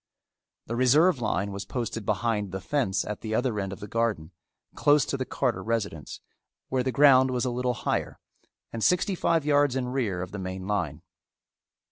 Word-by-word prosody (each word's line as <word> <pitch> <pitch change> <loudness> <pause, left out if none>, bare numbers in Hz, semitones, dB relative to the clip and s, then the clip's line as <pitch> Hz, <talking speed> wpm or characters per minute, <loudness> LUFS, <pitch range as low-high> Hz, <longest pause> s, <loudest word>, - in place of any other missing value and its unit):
The 115 - -4
reserve 135 +5 +4
line 100 -2 -1
was 100 0 -5
posted 115 0 -4
behind 105 -4 0
the 95 - -4
fence 115 -2 -1
at 105 -1 -5
the 110 -1 -3
other 120 -3 0
end 95 -1 -3
of 100 - -7
the 105 - -6
garden, 105 -7 -1 0.4
close 145 -2 +3
to - - -2
the 130 -1 -3
Carter 120 - -1
residence, 105 -9 -3 0.5
where 130 -1 +1
the 130 +1 -1
ground 130 -2 +6
was 125 0 -1
a 125 - 0
little 125 0 -1
higher, - - -2 0.6
and 115 -1 -3
sixty 180 +2 +2
five 165 -4 +1
yards 145 -3 +3
in 125 -2 -1
rear 110 -9 -1
of 90 - -8
the 105 - -6
main 95 0 -5
line. 105 +1 -2
115 Hz, 185 wpm, -27 LUFS, 100-130 Hz, 0.6 s, ground